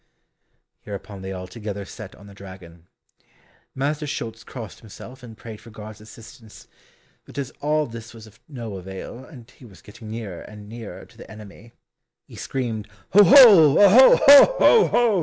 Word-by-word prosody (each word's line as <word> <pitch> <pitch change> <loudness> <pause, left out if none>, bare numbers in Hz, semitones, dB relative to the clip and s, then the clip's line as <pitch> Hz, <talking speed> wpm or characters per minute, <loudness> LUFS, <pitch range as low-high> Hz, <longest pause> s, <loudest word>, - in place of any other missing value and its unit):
Hereupon 100 -1 -10
they 95 0 -8
all 90 -1 -8
together 100 0 -9
set 100 0 -12
on 100 - -18
the 100 - -15
dragon. 95 -4 -15 0.9
Master 150 +3 -4
Schulz 115 -5 -7
crossed 115 -2 -11
himself 120 +4 -14
and 115 -3 -14
prayed 110 -2 -12
for 115 - -16
God's 110 -1 -13
assistance, 110 0 -16 0.6
but - - -17
as 140 -2 -6
all 150 +1 -1
this 115 -2 -12
was 115 -2 -15
of 110 +1 -21
no 115 -8 -9
avail, 95 +6 -11
and 125 -5 -16
he - - -22
was 105 -6 -18
getting 110 +1 -14
nearer 110 -6 -8
and 105 -1 -14
nearer 115 0 -11
to - - -24
the - - -14
enemy, 110 +1 -15 0.5
he - - -17
screamed 115 -5 -6 0.3
"Oho! 205 - +6
oho! 210 +6 +6
ho! 285 - +6
ho! 455 -2 +4
ho!" 230 -5 0
115 Hz, 165 wpm, -21 LUFS, 105-135 Hz, 0.9 s, Oho